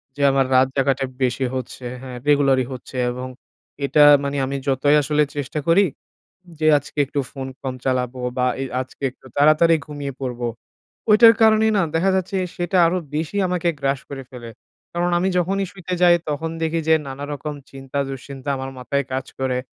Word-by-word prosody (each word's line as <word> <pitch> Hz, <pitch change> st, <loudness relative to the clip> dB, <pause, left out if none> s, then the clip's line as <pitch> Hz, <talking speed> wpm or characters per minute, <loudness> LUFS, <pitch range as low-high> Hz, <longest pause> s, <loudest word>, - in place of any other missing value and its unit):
যে 145 Hz, -, -6 dB
আমার 135 Hz, -1 st, +2 dB
রাত 130 Hz, +1 st, +5 dB
জাগাটা 135 Hz, 0 st, +1 dB, 0.2 s
বেশি 130 Hz, +1 st, 0 dB
হচ্ছে, 130 Hz, 0 st, -6 dB, 0.2 s
হ্যাঁ 130 Hz, -2 st, -8 dB
regular 140 Hz, -2 st, +4 dB
ই -, -, -6 dB
হচ্ছে 130 Hz, +1 st, -10 dB, 0.2 s
এবং 125 Hz, +1 st, -5 dB, 0.6 s
এটা 150 Hz, +1 st, +5 dB, 0.2 s
মানে 140 Hz, 0 st, -2 dB
আমি 140 Hz, +1 st, -3 dB
যতই 140 Hz, +2 st, +3 dB
আসলে 150 Hz, +1 st, +2 dB
চেষ্টা 145 Hz, +1 st, -3 dB
করি 190 Hz, +4 st, +5 dB, 0.7 s
যে, 155 Hz, -, 0 dB
আজকে 145 Hz, +1 st, -13 dB
একটু 140 Hz, +1 st, -2 dB
ফোন 135 Hz, -1 st, -6 dB
কম 130 Hz, -1 st, -4 dB
চালাবো 125 Hz, -1 st, -1 dB, 0.2 s
বা 125 Hz, 0 st, +2 dB
এ -, -, -1 dB, 0.2 s
আজকে 130 Hz, -, -16 dB
একটু 130 Hz, -, -21 dB
তাড়াতাড়ি 155 Hz, +3 st, +5 dB
ঘুমিয়ে 145 Hz, -2 st, -5 dB
পড়বো। 125 Hz, -2 st, -3 dB, 0.6 s
ওইটার 225 Hz, +2 st, +8 dB
কারণেই 220 Hz, 0 st, +5 dB
না -, -, +3 dB
দেখা 185 Hz, +4 st, +2 dB
যাচ্ছে 190 Hz, +1 st, -1 dB, 0.2 s
সেটা 175 Hz, +2 st, -1 dB
আরো 175 Hz, +2 st, +1 dB, 0.2 s
বেশি 160 Hz, +6 st, -2 dB
আমাকে 180 Hz, -1 st, 0 dB
গ্রাস 135 Hz, -1 st, 0 dB
করে 135 Hz, -1 st, -6 dB
ফেলে। 120 Hz, -2 st, -9 dB, 0.4 s
কারণ 175 Hz, +1 st, 0 dB
আমি 185 Hz, +2 st, +1 dB
যখনই 195 Hz, +3 st, 0 dB
শুইতে 185 Hz, -1 st, -6 dB
যাই 175 Hz, -1 st, +7 dB
তখন 160 Hz, +3 st, -2 dB
দেখি 165 Hz, +1 st, 0 dB
যে 160 Hz, -, +6 dB
নানারকম 145 Hz, +2 st, -5 dB, 0.2 s
চিন্তা-দুশ্চিন্তা 135 Hz, 0 st, -5 dB
আমার 130 Hz, 0 st, -5 dB
মাথায় 140 Hz, +3 st, -1 dB
কাজ 130 Hz, 0 st, -3 dB
করে। 130 Hz, -1 st, 0 dB
140 Hz, 175 wpm, -21 LUFS, 130-165 Hz, 0.7 s, ওইটার